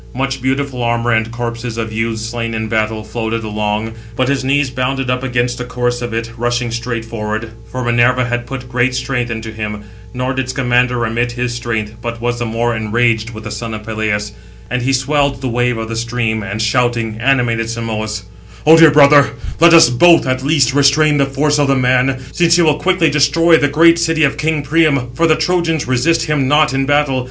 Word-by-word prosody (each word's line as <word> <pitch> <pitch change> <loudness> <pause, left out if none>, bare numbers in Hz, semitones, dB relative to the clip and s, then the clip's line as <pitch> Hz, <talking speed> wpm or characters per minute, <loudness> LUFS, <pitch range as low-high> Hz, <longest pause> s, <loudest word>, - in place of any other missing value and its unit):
Much 135 0 -2
beautiful 135 0 -2
armour 120 0 0
and 110 0 0
corpses 115 0 -5
of 110 -1 -4
youths 115 0 -2
slain 115 0 -4
in 110 0 -3
battle, 110 0 -1
floated 115 +1 -4
along; 105 +1 -3 0.2
but 130 +1 0
his 135 -1 -1
knees 135 0 +1
bounded 130 0 -2
up 125 0 -1
against 125 -1 -1
the - - -3
course 120 0 -2
of 120 -1 -4
it 115 0 -4
rushing 120 0 -1
straight 115 -1 -4
forward; 110 0 -5 0.2
for 130 +1 -4
Minerva 120 +1 +2
had 120 0 -3
put 125 -1 -7
great 125 +1 0
strength 125 -1 -2
into 110 -1 -5
him. 105 -1 -6 0.3
Nor 125 +1 -3
did 130 0 -3
Scamander 125 -1 +1
remit 120 +1 -1
his 125 0 -3
strength, 115 -3 -3
but 115 0 -5
was 120 0 -2
the 120 - -2
more 115 +1 -1
enraged 110 +1 0
with 110 -2 -10
the 105 - -7
son 110 +1 -5
of 105 - -8
Peleus. 110 -2 -2 0.4
And 125 0 -1
he 130 +2 0
swelled 140 +1 0
the 130 - -3
wave 120 0 0
of 110 0 -4
the 115 - -5
stream, 115 -1 -2
and, 100 +1 -5
shouting, 115 -1 0
animated 120 -3 +1
Simoïs: 110 -2 -4 0.4
"O 160 +2 +8
dear 165 -1 +7
brother, 145 -1 +6 0.3
let 170 +1 +6
us 165 -7 +7
both, 165 +7 +5
at 130 0 -1
least, 140 -3 +2
restrain 145 +2 +3
the 140 - +2
force 145 +2 0
of 145 - +2
the 135 - +2
man, 130 +1 +1
since 170 -1 +3
he 175 - +3
will 150 -2 +2
quickly 180 -4 +2
destroy 150 +3 +3
the 145 -2 +2
great 165 +3 +4
city 165 -1 +1
of 140 - +2
king 155 -1 -1
Priam, 140 -4 +1
for 165 +6 +1
the 155 - +4
Trojans 165 -2 -1
resist 130 +6 +1
him 150 -4 0
not 150 -1 +3
in 135 0 -1
battle. 145 -2 +1
125 Hz, 205 wpm, -16 LUFS, 115-140 Hz, 0.4 s, O